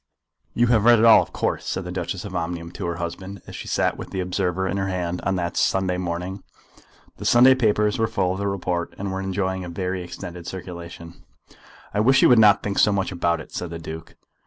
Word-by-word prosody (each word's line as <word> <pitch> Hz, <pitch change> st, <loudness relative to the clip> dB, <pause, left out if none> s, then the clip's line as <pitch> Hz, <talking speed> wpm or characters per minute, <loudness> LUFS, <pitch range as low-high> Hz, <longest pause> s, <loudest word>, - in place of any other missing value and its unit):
"You 120 Hz, -, +3 dB
have 115 Hz, -3 st, +3 dB
read 120 Hz, 0 st, +7 dB
it 110 Hz, -, +4 dB
all, 115 Hz, -1 st, +8 dB
of -, -, -7 dB
course," -, -, -2 dB
said -, -, -2 dB
the -, -, -5 dB
Duchess -, -, -4 dB
of -, -, -7 dB
Omnium 85 Hz, 0 st, -4 dB
to 90 Hz, 0 st, -5 dB
her 85 Hz, -, -2 dB
husband, 95 Hz, +3 st, -6 dB
as -, -, -10 dB
she -, -, -7 dB
sat -, -, 0 dB
with -, -, -8 dB
the 95 Hz, -, -4 dB
Observer 90 Hz, 0 st, -1 dB
in 100 Hz, -, -2 dB
her 95 Hz, 0 st, -1 dB
hand 90 Hz, -1 st, -3 dB
on 95 Hz, +1 st, -1 dB
that 85 Hz, -2 st, -2 dB
Sunday 95 Hz, -1 st, +1 dB
morning. 90 Hz, +2 st, -4 dB, 0.8 s
The -, -, -8 dB
Sunday 125 Hz, +2 st, +7 dB
papers 105 Hz, -3 st, +1 dB
were 110 Hz, -, +2 dB
full 95 Hz, -4 st, 0 dB
of 95 Hz, -, -4 dB
the 100 Hz, -, -1 dB
report, 90 Hz, -3 st, -2 dB
and 100 Hz, 0 st, -4 dB
were 95 Hz, 0 st, -3 dB
enjoying 95 Hz, -1 st, -2 dB
a 90 Hz, -, -6 dB
very 90 Hz, +1 st, -3 dB
extended 85 Hz, -1 st, -8 dB
circulation. 85 Hz, -2 st, -9 dB, 0.7 s
"I 105 Hz, -, 0 dB
wish 135 Hz, +5 st, +4 dB
you -, -, +7 dB
would 120 Hz, -2 st, +6 dB
not 105 Hz, -2 st, +6 dB
think 100 Hz, -1 st, -1 dB
so 105 Hz, -, +5 dB
much 100 Hz, -1 st, -1 dB
about 85 Hz, -1 st, 0 dB
it," -, -, -13 dB
said 90 Hz, -, -5 dB
the 85 Hz, -, -6 dB
Duke. 80 Hz, 0 st, -9 dB
95 Hz, 230 wpm, -23 LUFS, 85-100 Hz, 0.8 s, all